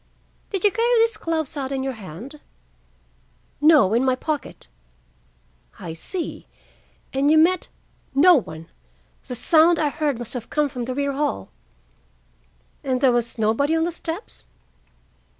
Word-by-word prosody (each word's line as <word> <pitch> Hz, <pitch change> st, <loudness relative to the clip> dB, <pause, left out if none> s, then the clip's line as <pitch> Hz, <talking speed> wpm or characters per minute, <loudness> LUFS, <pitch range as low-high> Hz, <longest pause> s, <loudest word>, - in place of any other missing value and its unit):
"Did 390 Hz, -3 st, -3 dB
you 415 Hz, -, +5 dB
carry 470 Hz, +4 st, +2 dB
these 455 Hz, 0 st, +3 dB
gloves 320 Hz, -4 st, -3 dB
out 270 Hz, -2 st, -4 dB
in 265 Hz, -1 st, -2 dB
your 270 Hz, 0 st, -2 dB
hand?" 220 Hz, -, -10 dB, 1.2 s
"No, 295 Hz, -10 st, +5 dB
in 235 Hz, +3 st, +3 dB
my 260 Hz, -1 st, +2 dB
pocket." 295 Hz, -, -5 dB, 1.1 s
"I 165 Hz, -, -7 dB
see. 335 Hz, -, -5 dB, 0.7 s
And 275 Hz, +2 st, +2 dB
you 315 Hz, -, +5 dB
met—" 340 Hz, +3 st, +3 dB, 0.5 s
"No 350 Hz, +6 st, +7 dB
one. 165 Hz, -, -4 dB, 0.6 s
The 250 Hz, -, -5 dB
sound 325 Hz, +6 st, +4 dB
I 305 Hz, -2 st, +1 dB
heard 290 Hz, -3 st, -1 dB
must 240 Hz, -1 st, -8 dB
have 245 Hz, -3 st, -6 dB
come 300 Hz, -1 st, +1 dB
from 245 Hz, -2 st, -5 dB
the 255 Hz, +1 st, -4 dB
rear 280 Hz, 0 st, 0 dB
hall." 270 Hz, -, -2 dB, 1.3 s
"And 260 Hz, -2 st, 0 dB
there 260 Hz, -1 st, +4 dB
was 240 Hz, -1 st, -1 dB
nobody 225 Hz, +8 st, +1 dB
on 325 Hz, -, +1 dB
the 345 Hz, -, -1 dB
steps?" 335 Hz, +4 st, -7 dB
280 Hz, 150 wpm, -23 LUFS, 245-325 Hz, 1.3 s, No